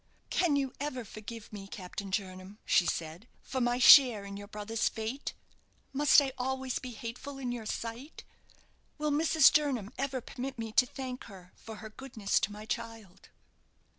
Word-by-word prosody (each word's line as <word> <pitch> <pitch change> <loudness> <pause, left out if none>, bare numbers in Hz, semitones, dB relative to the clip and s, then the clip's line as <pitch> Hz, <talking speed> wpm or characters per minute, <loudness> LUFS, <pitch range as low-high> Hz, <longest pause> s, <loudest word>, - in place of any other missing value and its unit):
"Can 335 -5 +2
you 270 -2 0
ever 260 -4 -3
forgive 215 +1 -9
me, 195 -2 -7
Captain 195 +1 -7
Jernam," 190 0 -4
she 175 - +4
said, 165 +7 -4 0.2
"for 260 - -3
my 240 0 +2
share 250 -5 +8
in 200 0 -7
your 205 0 -8
brother's 210 +2 -1
fate? 225 +5 -5 0.6
Must 290 +1 +6
I 270 -2 -1
always 265 0 -2
be 255 - -7
hateful 240 +4 -7
in 255 -2 -3
your 235 -3 -5
sight? 235 +8 -6 0.7
Will 300 0 -1
Mrs. 310 -1 +5
Jernam 260 -8 +1
ever 270 -1 -1
permit 255 +2 -6
me 225 -1 -4
to 250 +3 +4
thank 255 -1 -6
her 185 -4 -13
for 225 - -10
her 220 0 -9
goodness 220 -5 -1
to 210 - -1
my 210 +1 -9
child?" 225 -5 -6
230 Hz, 165 wpm, -31 LUFS, 210-265 Hz, 0.7 s, share